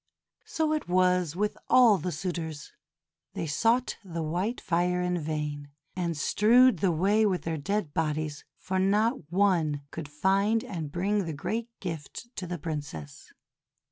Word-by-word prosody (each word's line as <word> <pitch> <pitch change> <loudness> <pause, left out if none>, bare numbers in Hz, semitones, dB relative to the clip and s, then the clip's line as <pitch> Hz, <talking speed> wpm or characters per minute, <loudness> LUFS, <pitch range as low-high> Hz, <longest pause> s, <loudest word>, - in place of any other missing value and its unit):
So 320 -8 0
it 305 -11 -3
was 180 -3 +2
with 210 +3 0
all 230 -6 +6
the 180 - -3
suitors, 160 -3 -4 0.6
they - - -2
sought 230 - +1
the 170 -4 -4
white 180 +10 -1
fire 180 +1 +1
in 180 0 0
vain, 150 -2 -4 0.3
and 170 -3 -2
strewed 230 - +4
the 185 +1 +2
way 195 +7 +3
with 190 -4 +1
their 165 0 -2
dead 185 0 -2
bodies; 155 -2 -2
for 190 0 -2
not 205 - +1
one 170 -7 +2
could 160 -3 -6
find 195 +8 +2
and 160 -7 -5
bring 195 +4 0
the 160 - -4
great 225 +11 -3
gift 180 - -7
to 185 - -4
the 175 0 -3
Princess. 145 - -6
180 Hz, 150 wpm, -28 LUFS, 155-205 Hz, 0.6 s, all